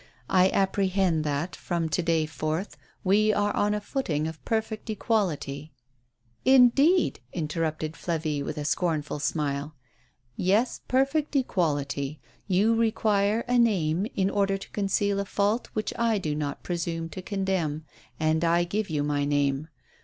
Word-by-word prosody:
I 185 0 +5
apprehend 190 -4 +1
that, 150 +4 -2
from 170 -2 -2
to 180 - 0
day 165 -2 +1
forth, 155 +4 -3 0.3
we 210 +3 +4
are 205 0 0
on 210 0 +2
a - - -1
footing 170 - -2
of 160 0 -8
perfect 220 -1 -2
equality." 160 - -1 0.4
" 120 -1 -41
Indeed! 280 +8 +4
" - - -36
interrupted 155 0 -2
Flavie, 160 -2 -2
with 150 +2 -5
a 150 - -3
scornful 150 -2 -1
smile. 145 0 -2 0.6
"Yes, 205 +7 +1
perfect 275 +4 +1
equality. 150 - 0 0.3
You 205 +4 +3
require 215 -1 +2
a 245 0 +1
name, 190 -5 +2
in 195 -2 +1
order 195 -1 +1
to 195 - -11
conceal 200 0 0
a 200 - -1
fault 205 +4 0
which 215 - -2
I 230 -2 +2
do 155 -6 -2
not 145 -1 -4
presume 170 -1 -3
to 185 - -7
condemn, 185 -6 -2 0.3
and 160 +1 +1
I 170 +1 +3
give 200 +4 -2
you 150 -2 0
my 145 -1 0
name. 145 0 0
175 Hz, 150 wpm, -27 LUFS, 155-205 Hz, 0.6 s, I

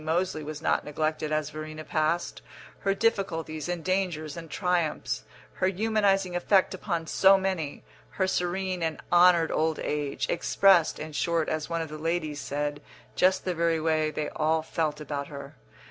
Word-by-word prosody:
Moseley 160 0 -1
was 155 +1 -7
not - - +2
neglected 155 +1 -2
as 155 -1 -1
Verena 155 +1 -7
passed), 155 +2 -1 0.4
her 195 -1 0
difficulties 175 -8 -1
and 175 -2 -3
dangers 175 -6 -1
and 165 -1 -8
triumphs, 175 -3 -1 0.3
her 185 - 0
humanising 195 -2 +1
effect 190 +2 +3
upon 170 -3 -3
so 195 +4 +5
many, 185 -6 -3 0.3
her 190 - 0
serene 185 0 -1
and 160 -1 -1
honoured 175 -2 +6
old 160 0 +1
age 145 -2 -2
expressed, 175 0 +4
in 155 0 -6
short, 165 +1 0
as 155 0 -2
one 165 -1 -1
of 160 - -8
the 155 0 -7
ladies 155 -2 -2
said, 145 +1 -3 0.3
just 185 +1 +3
the 185 - 0
very 165 -1 +1
way 155 -1 +1
they 155 0 -3
all 160 +1 0
felt 155 -2 -2
about 145 -2 -4
her. 140 -1 -9
165 Hz, 160 wpm, -27 LUFS, 155-180 Hz, 0.4 s, honoured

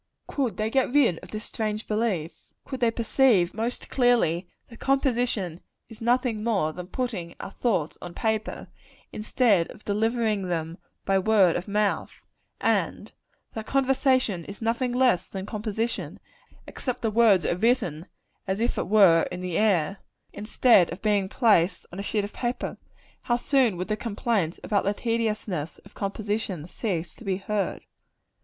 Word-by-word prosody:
Could 245 -9 -2
they 215 +1 -1
get 265 -1 +2
rid 250 - +3
of - - -13
this 215 +1 -6
strange 215 0 -3
belief 210 -7 0 0.3
could 265 - -6
they 235 - +3
perceive, 225 -5 +3
most 230 +3 -3
clearly, 230 -9 +2 0.2
that 230 - -14
composition 245 - 0 0.3
is 225 -1 -13
nothing 240 -2 +1
more 195 -9 +1
than 180 +1 -7
putting 200 -8 -4
our - - -7
thoughts 195 -12 -1
on 175 -1 -8
paper, 220 -1 -2 0.4
instead 215 -4 +2
of - - -13
delivering 215 -1 0
them 165 -1 -3 0.3
by 195 0 +3
word 195 -3 +4
of 180 - -3
mouth 205 0 -1 0.4
and - - 0 0.4
that 220 -1 -6
conversation 260 - +2
is 200 - -9
nothing 235 +2 0
less 245 -8 +2
than 190 -1 -5
composition, 220 +2 -3 0.5
except 250 -2 -4
that 225 - +2
the - - -7
words 220 -6 +5
are - - +1
written 195 - 0 0.4
as 190 +2 -1
it 235 +2 0
were 190 -6 +6
in 180 0 -5
the 180 -2 -3
air, 195 -4 +2 0.4
instead 210 -4 +4
of 180 +5 -8
being 205 -3 +2
placed 195 -7 +3
on 185 - -6
a - - -1
sheet 205 +1 -1
of 205 - -6
paper 240 0 -3 0.5
how 240 - +4
soon 245 -5 +2
would 180 - -3
the 215 - 0
complaints 210 -5 -1
about 205 -2 +1
the 200 +1 0
tediousness 215 -9 -2
of - - -16
composition 200 -4 -3
cease 180 -5 -3
to - - -14
be 195 -3 -1
heard. 200 +1 -2
215 Hz, 160 wpm, -26 LUFS, 185-235 Hz, 0.5 s, were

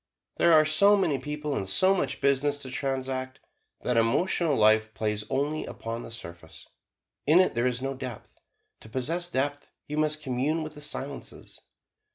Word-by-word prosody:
There 170 - +4
are 155 -1 +6
so 200 +7 +5
many 165 -8 +1
people, 150 +1 -4
and 95 -5 -3
so 185 - +4
much 140 -9 -2
business 140 +1 +2
to 130 - -7
transact, 130 -1 -3 0.4
that 125 -1 0
emotional 150 +7 +2
life 110 0 +3
plays 105 -1 -2
only 145 +3 -1
upon 115 +1 -6
the - - -9
surface 85 -8 -9 0.6
in 160 +4 +6
it 185 - +3
there 120 +2 +1
is 125 0 -2
no 135 0 -2
depth. 130 -4 -8 0.5
To 110 - -14
possess 165 +9 -2
depth 145 0 -2 0.2
you 150 +1 -3
must 155 0 0
commune 140 +5 -1
with 155 0 -7
the 150 - -11
Silences. 140 -1 -5
135 Hz, 170 wpm, -27 LUFS, 125-155 Hz, 0.6 s, are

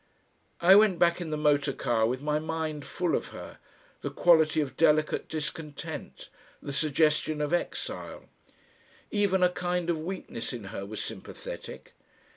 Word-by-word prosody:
I 185 +3 +8
went 205 -3 +5
back 170 +1 +3
in 170 - -4
the 155 - -2
motor 145 -2 +2
car 115 -3 +1
with 130 +3 -3
my 150 0 +1
mind 155 -2 -3
full 175 -2 -1
of - - -2
her, - - -10 0.4
the - - -3
quality 160 -3 +4
of 145 -3 -2
delicate 155 -1 +2
discontent, 150 -1 -6 0.3
the 140 - -6
suggestion 155 +1 +2
of 150 +2 -1
exile. 175 - -3 0.9
Even 200 -3 +2
a 180 - +6
kind 180 -1 -1
of 160 - -2
weakness 175 -10 -5
in 120 -3 -6
her 100 - -5
was 110 +1 -5
sympathetic. - - -8
155 Hz, 150 wpm, -28 LUFS, 150-175 Hz, 0.9 s, I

